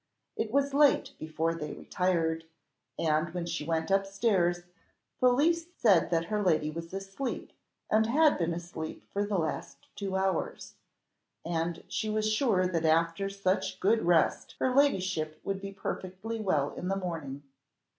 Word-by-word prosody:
It 220 - -2
was 280 +3 +1
late 285 -1 +4
before 160 +1 -1
they 150 -3 -5
retired, 165 -3 -1 0.5
and 155 +1 +1
when 175 -1 -2
she 170 - -3
went 160 +2 -1
up 195 0 +3
stairs, 195 -4 +1 0.6
Felicie 320 +7 +3
said 190 -7 +4
that 165 -1 +1
her 210 +3 -1
lady 155 -5 +2
was 165 +1 -7
asleep, 195 +7 -5 0.4
and 220 +1 +3
had 300 +3 +4
been 170 -1 +1
asleep 170 -2 -6
for 200 - +1
the 205 -1 -1
last 160 -2 -3 0.2
two 195 -2 -3
hours, 190 -2 -1 0.7
and 165 0 -2
she 215 - -2
was 215 0 0
sure 215 -4 +2
that 170 -3 0
after 165 +4 +2
such 195 -1 -1
good 220 +4 +3
rest 170 -2 +2
her 255 - +1
ladyship 190 - +1
would 195 -1 -3
be 195 0 -5
perfectly 195 +3 -5
well 155 -9 +1
in 180 - -5
the 195 - +1
morning. 160 -7 -5
185 Hz, 155 wpm, -30 LUFS, 165-215 Hz, 0.7 s, late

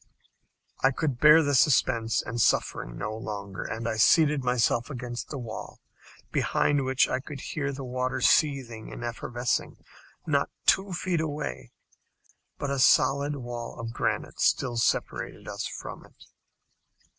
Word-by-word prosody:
I 135 - +6
could 135 -2 -2
bear 155 +3 +7
the 145 -1 0
suspense 120 -5 +3
and 115 +2 -3
suffering - - +1
no 110 - -4
longer, 100 -3 -6
and 110 +1 -5 0.2
seated 150 0 +4
myself 120 -1 +1
against 120 -3 -6
the 145 - -5
wall, 115 -4 -7 0.5
behind 145 -2 +1
which 130 0 +3
I 130 - -1
could 140 +1 -8
hear 140 +1 -3
the 135 0 -6
water 130 +1 -2
seething 130 -6 +1
and - - -7
effervescing 120 +1 -2 0.5
not - - +1 0.2
two 190 0 +3
feet 175 -2 -1
away. 145 - -4 0.9
But 145 - -3
a 140 - -1
solid 140 +3 +4
wall 120 -3 -6
of 115 0 -5
granite - - -2
still 120 -2 +2
separated 115 - -1
us - - -4
from - - -8
it! - - -19
130 Hz, 140 wpm, -27 LUFS, 115-145 Hz, 0.9 s, bear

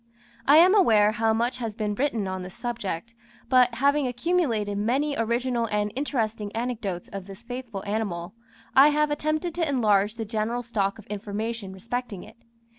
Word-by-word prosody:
I 290 +2 +8
am 360 +4 +7
aware 220 - +5
how 220 +1 +1
much 240 +3 0
has 225 -4 -4
been 210 -2 -2
written 230 -4 -1
on 185 0 -4
this 180 0 -9
subject, 230 -3 -4 0.4
but 250 -2 +4
having 280 +2 +2
accumulated 245 - 0
many 270 +7 0
original 235 +1 0
and 210 -1 -1
interesting 225 -7 -2
anecdotes 225 -7 -3
of 195 -1 -7
this 195 +3 -11
faithful 245 -4 -6
animal, 200 -4 -3 0.4
I 270 +2 +9
have 300 0 +2
attempted 310 +3 -1
to 330 -3 -1
enlarge 210 -5 +2
the 225 -1 -4
general 225 +3 -2
stock 205 -4 -1
of 215 - -13
information 210 0 -4
respecting 225 +1 -5
it. - - -15
230 Hz, 165 wpm, -26 LUFS, 205-255 Hz, 0.4 s, I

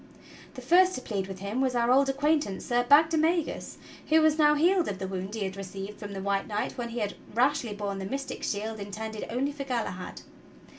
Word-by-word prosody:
The 255 - -8
first 365 +7 +5
to 255 - -5
plead 200 -6 -3
with 190 -1 -8
him 205 +6 -2
was 260 -2 +1
our 240 0 +2
old 270 +1 +4
acquaintance 290 -6 0
Sir 240 0 +2
Bag 290 +6 +6
demagus, 325 +1 0 0.3
who 315 +1 +6
was 315 0 +3
now 300 -1 +6
healed 345 +3 +3
of 195 - -3
the 190 0 -4
wound 190 +2 -5
he 215 - -2
had 190 0 -4
received 195 +1 -7
from 205 -1 -7
the 195 - -5
White 200 0 0
Knight 210 -1 -2
when 240 -1 -4
he 235 - -7
had 205 -1 -1 0.2
rashly 255 -2 +2
borne 200 -1 -3
the 190 - -4
mystic 275 +6 -4
shield 215 +1 -3
in 200 0 -6
tended 220 +1 -5
only 260 +5 -1
for 285 -1 -6
Galahad. 230 -8 -4
235 Hz, 220 wpm, -28 LUFS, 200-290 Hz, 0.3 s, Bag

